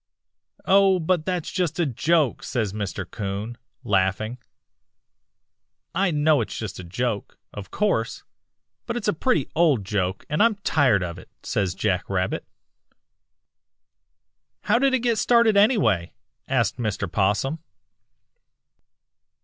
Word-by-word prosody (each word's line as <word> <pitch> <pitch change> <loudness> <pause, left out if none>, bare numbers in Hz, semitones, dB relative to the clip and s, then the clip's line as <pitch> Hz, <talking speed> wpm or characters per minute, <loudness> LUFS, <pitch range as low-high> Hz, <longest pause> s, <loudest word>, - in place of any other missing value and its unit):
"'Oh, 195 -1 +5
but 170 -1 0
that's 180 -3 -2
just 175 -3 -1
a 170 - +3
joke,' 150 +1 +1
says 110 -6 -2
Mr. 100 -3 -4
'Coon, 100 +4 -5 0.3
laughing. 105 +3 0 1.5
"'I 195 -1 +2
know 150 -3 +3
it's 110 - -5
just 110 -5 -6
a - - -7
joke, 105 +5 -3 0.2
of 100 -2 -8
course, 200 - -1 0.6
but 235 - -2
it's 215 - -4
a 205 - +3
pretty 250 - 0
old 150 - +2
joke, 95 -1 -2
and 150 - 0
I'm 230 -1 +4
tired 130 - +3
of 85 -1 -5
it,' - - -15
says 95 -3 -1
Jack 95 -3 -1
Rabbit. 95 -1 -2 2.1
"'How 235 +3 +2
did 270 0 +3
it 255 - -1
get 235 -3 +1
started 235 -3 +4
anyway?' 200 - +3 0.3
asked - - +1
Mr. 110 -4 -2
'Possum. 105 - 0
125 Hz, 125 wpm, -24 LUFS, -, 2.1 s, Oh